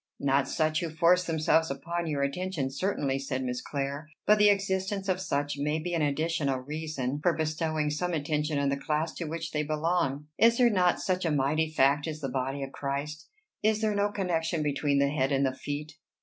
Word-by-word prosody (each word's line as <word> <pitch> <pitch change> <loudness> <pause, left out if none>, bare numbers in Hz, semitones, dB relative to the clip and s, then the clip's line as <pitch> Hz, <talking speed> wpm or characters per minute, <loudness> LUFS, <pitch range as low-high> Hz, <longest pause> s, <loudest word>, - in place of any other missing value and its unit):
"Not 140 0 +2
such 155 +2 +1
who 170 -2 -3
force 170 +3 +3
themselves 160 0 +2
upon 170 +5 -3
your 145 -3 0
attention 140 -1 -2
certainly," 140 -3 -1
said 130 -1 -3
Miss 125 -1 -3
Clare; 140 +2 -4 0.2
"but 210 0 +5
the 210 0 +7
existence 195 0 0
of 185 -1 0
such 145 -4 -2
may 150 +2 0
be 175 +3 -4
an 165 - +1
additional 150 -1 0
reason 145 -1 -3
for 175 +2 +3
bestowing 155 -1 -1
some 180 +4 -1
attention 150 -1 -1
on 140 -1 +1
the 140 - 0
class 155 +3 -1
to 170 - -5
which 165 +1 -4
they 150 - 0
belong. 150 -2 0
Is 230 +2 +5
there 245 -2 +5
not 180 -3 +3
such 185 -1 -1
a 165 - +1
mighty 150 +2 +1
fact 145 0 +3
as 155 -1 -4
the 135 -3 -3
body 135 +2 -2
of 135 - -6
Christ? 145 +3 -4 0.3
Is 215 0 +2
there 215 -1 +1
no 205 0 +1
connection 170 -5 -1
between 145 -1 +1
the 140 0 +3
head 140 -1 0
and 135 0 +2
the 130 - 0
feet?" 145 +2 -5
155 Hz, 205 wpm, -29 LUFS, 140-175 Hz, 0.3 s, the